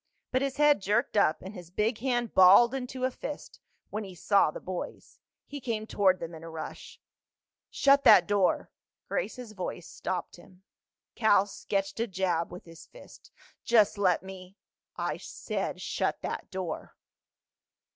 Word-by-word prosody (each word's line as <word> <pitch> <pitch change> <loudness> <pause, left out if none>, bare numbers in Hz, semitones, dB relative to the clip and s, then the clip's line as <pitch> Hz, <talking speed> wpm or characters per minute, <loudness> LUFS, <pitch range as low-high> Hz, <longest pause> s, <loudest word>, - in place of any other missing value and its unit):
But 255 - +1
his 275 -1 -2
head 295 -5 +4
jerked 210 +5 0
up 200 -6 +2
and 190 +2 -8
his 175 -4 -10
big 215 +5 -1
hand 240 -2 -1
balled 195 +6 +7
into 255 -1 -5
a 260 - +1
fist - - -8 0.3
when 215 +1 -3
he 190 -2 -10
saw 200 -1 +3
the - - -7
boys. 185 -1 -7 0.3
He 285 -1 -8
came 225 -3 -3
toward 190 -4 +2
them 165 0 -6
in 160 0 -10
a 165 - -8
rush. 160 -1 -8 0.7
"Shut 280 0 +4
that - - +8
door!" 200 -3 +1 0.4
Grace's 250 - -3
voice 180 -3 -6
stopped 180 -1 -5
him. 185 +1 -18 0.5
Cal 205 -4 +4
sketched 195 0 -3
a 230 - 0
jab 180 -4 -1
with 180 - -10
his 165 -1 -13
fist. - - -16 0.3
"Just 215 -3 +3
let 185 -3 +2
me—!" 190 0 -11 0.4
"I - - -2
said - - -4
shut - - -2
that - - -4
door." 185 -4 -5
200 Hz, 155 wpm, -29 LUFS, 185-240 Hz, 0.7 s, that